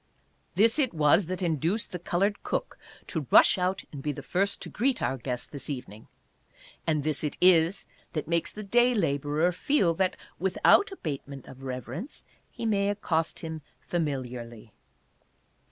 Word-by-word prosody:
This 225 - +4
it 260 - +1
was 155 +4 +4
that 185 +1 -3
induced 170 - 0
the 180 - -4
colored 195 +4 0
cook - - -3 0.3
to 155 -7 -4
rush - - +6
out 185 +1 0
and 140 - -7
be 150 - -1
the 140 - -8
first 195 +2 0
to - - -7
greet 255 +3 +1
our 130 +3 0
guest 125 -1 -5
this 140 0 -6
evening, 115 -6 -7 0.8
and 155 -3 +1
this 155 0 +1
it 150 - -2
is 180 0 +4 0.3
that 155 - -3
makes 170 0 0
the 215 - -7
day 240 +4 +3
laborer 150 -1 +1
feel 180 - +2
that, 185 +2 0 0.2
without 190 - +4
abatement 140 - -6
of 130 - -12
reverence, 135 - -6 0.2
he - - -6
may 200 -2 +2
accost 165 -5 -1
him 160 -1 -5 0.2
familiarly. 125 -8 -4
165 Hz, 155 wpm, -28 LUFS, 140-195 Hz, 0.8 s, rush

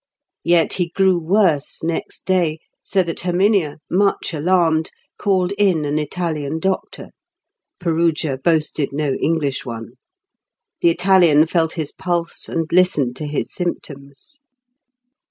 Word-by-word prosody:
Yet 170 -1 +3
he 175 -2 0
grew 190 0 +2
worse 165 -5 +1
next 165 0 -4
day, 175 -4 +1 0.2
so 190 -2 +1
that 170 -2 -5
Herminia, 180 -3 +1
much 195 -1 0
alarmed, 160 0 +2 0.3
called 190 -2 +1
in 180 -7 +2
an 145 +1 0
Italian 155 -1 -3
doctor. 190 +3 -3 0.7
Perugia 165 -5 0
boasted 155 -3 +1
no 145 -1 -1
English 150 -5 0
one. 115 -2 -7 0.9
The 170 - +5
Italian 170 -3 +4
felt 165 -1 0
his 155 -4 -3
pulse, 175 -2 -3
and 165 -1 -1
listened 150 -9 +2
to 150 - -4
his 145 0 -3
symptoms. 145 - -6
165 Hz, 120 wpm, -20 LUFS, 150-180 Hz, 0.9 s, The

